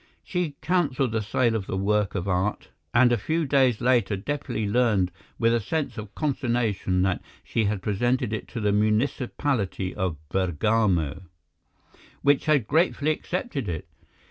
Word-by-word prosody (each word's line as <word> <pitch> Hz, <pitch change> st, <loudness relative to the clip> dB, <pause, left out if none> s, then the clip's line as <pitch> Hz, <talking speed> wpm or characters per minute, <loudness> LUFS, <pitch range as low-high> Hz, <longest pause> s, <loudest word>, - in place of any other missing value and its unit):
She 180 Hz, -6 st, -2 dB
cancelled 140 Hz, -7 st, +1 dB
the 110 Hz, 0 st, 0 dB
sale 115 Hz, +3 st, +1 dB
of 100 Hz, -4 st, -3 dB
the 95 Hz, -, -2 dB
work 105 Hz, +1 st, +1 dB
of 95 Hz, 0 st, -2 dB
art, 95 Hz, +2 st, -1 dB, 0.2 s
and 120 Hz, 0 st, +5 dB
a 120 Hz, -, +2 dB
few 160 Hz, +8 st, 0 dB
days 130 Hz, -5 st, +3 dB
later 120 Hz, -5 st, +2 dB
Deplis 125 Hz, -1 st, -3 dB
learned 105 Hz, -5 st, +2 dB, 0.3 s
with 115 Hz, 0 st, +3 dB
a 120 Hz, -, +3 dB
sense 145 Hz, +8 st, -2 dB
of 110 Hz, -3 st, -8 dB
consternation 120 Hz, -10 st, 0 dB
that 95 Hz, -1 st, 0 dB, 0.2 s
she 115 Hz, -, 0 dB
had 100 Hz, -2 st, -1 dB
presented 120 Hz, +3 st, 0 dB
it 110 Hz, -, -4 dB
to 120 Hz, -, -6 dB
the 105 Hz, -2 st, +1 dB
municipality 110 Hz, -1 st, 0 dB
of 90 Hz, -4 st, -2 dB
Bergamo, 95 Hz, -2 st, +1 dB, 1.0 s
which 145 Hz, +2 st, +3 dB
had 145 Hz, -7 st, +3 dB
gratefully 155 Hz, -, +2 dB
accepted 155 Hz, -, -3 dB
it. 80 Hz, -2 st, -4 dB
115 Hz, 150 wpm, -25 LUFS, 100-135 Hz, 1.0 s, and